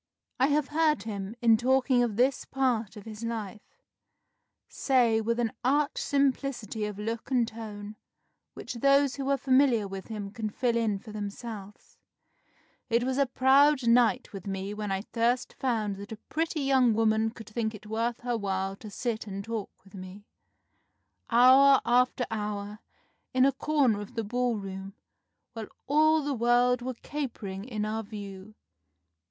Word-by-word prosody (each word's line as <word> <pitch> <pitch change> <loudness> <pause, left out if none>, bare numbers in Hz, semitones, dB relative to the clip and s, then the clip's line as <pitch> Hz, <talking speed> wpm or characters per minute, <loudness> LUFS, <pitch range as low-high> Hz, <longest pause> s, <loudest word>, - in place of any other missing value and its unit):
I 260 - +4
have 295 -1 +1
heard 305 0 +2
him, 205 -1 -5
in 225 -1 +6
talking 255 +1 +2
of 235 -4 0
this 255 +4 +2
part 240 -6 -1
of 205 - -11
his 220 0 -8
life, 220 -3 -4 1.1
say, 240 -5 +2
with 230 +2 -1
an 230 -2 0
arch 285 +3 +1
simplicity 270 -6 -1
of 210 -1 -5
look 225 +2 -4
and 245 -3 +2
tone 215 -2 -8 0.6
which - - -6
those 275 +3 +3
who 275 - -3
were 275 0 +2
familiar 260 -6 +3
with 195 0 -7
him 210 -3 -6
can 215 0 -4
fill 235 +2 0
in 225 -3 +1
for 215 +2 -12
themselves 210 0 -8 0.9
'It 235 0 +2
was 260 +2 -1
a 280 - +3
proud 265 +1 +4
night 230 -4 +3
with 195 -1 -8
me 195 +1 -4
when 210 -1 -4
I 195 +1 -2
first 240 +2 0
found 220 -6 -1
that 200 +2 -9
a 220 - -6
pretty 320 -1 -1
young 260 -4 +3
woman 220 0 +2
could 225 -1 -12
think 220 0 -2
it 215 - -13
worth 230 +2 -2
her 245 -1 -1
while 195 -2 -2
to 215 - -10
sit 225 +1 -3
and 200 0 -5
talk 225 -1 -4
with 195 - -20
me, 190 +1 -10 1.0
hour 260 +3 +7
after 250 +1 +2
hour, 210 -1 -4 0.6
in 255 0 +5
a 275 - +4
corner 270 -9 +1
of 205 +4 -10
the 225 - -1
ball 245 +2 -1
room, 195 0 -7 0.6
while 225 -2 -6 0.2
all 310 +2 +3
the 285 0 -1
world 245 +1 +3
were 255 0 -4
capering 225 -9 -5
in 215 -4 -3
our 220 +1 -2
view. 205 -1 -9
230 Hz, 165 wpm, -28 LUFS, 210-255 Hz, 1.1 s, hour